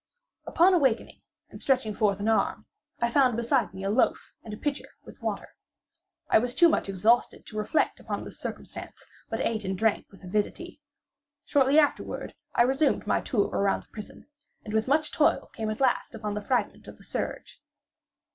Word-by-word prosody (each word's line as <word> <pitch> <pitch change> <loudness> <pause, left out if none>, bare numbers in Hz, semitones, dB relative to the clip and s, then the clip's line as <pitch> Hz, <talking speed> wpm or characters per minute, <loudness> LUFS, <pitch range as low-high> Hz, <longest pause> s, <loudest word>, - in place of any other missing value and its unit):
Upon 360 +3 +4
awaking, 265 -9 +1 0.3
and - - -10
stretching 255 -6 +1
forth 205 -1 +1
an 205 - -2
arm, 225 - +1 0.3
I 235 - +2
found 255 -3 +3
beside 235 +2 +1
me 190 - -8
a 195 - 0
loaf 240 +4 +1
and 220 - -10
a 210 - -6
pitcher 290 +2 -3 0.2
with - - -14
water. - - -3 0.8
I - - +5
was 245 +2 -2
too 340 - +6
much 255 - 0
exhausted 210 +6 +2
to 215 - -12
reflect 215 +8 0
upon - - -4
this - - -9
circumstance, - - -7 0.2
but 225 - -2
ate 220 -2 -1
and 190 0 -2
drank 220 +1 +1
with 195 - -18
avidity. 215 - -3 0.6
Shortly 275 +1 +3
afterward, 300 -2 +1 0.2
I - - +6
resumed 270 +4 +1
my - - +1
tour 210 -7 0
around 200 0 0
the - - -30
prison, 210 -2 -10 0.4
and 210 - -6
with 220 +2 +1
much 300 +3 +2
toil 310 - +2
came 220 -2 -3
at 215 - -4
last 255 -2 +1
upon 210 -2 -4
the 210 - -3
fragment 250 +4 -1
of - - -11
the - - -18
serge. - - -5
230 Hz, 185 wpm, -27 LUFS, 210-270 Hz, 0.8 s, too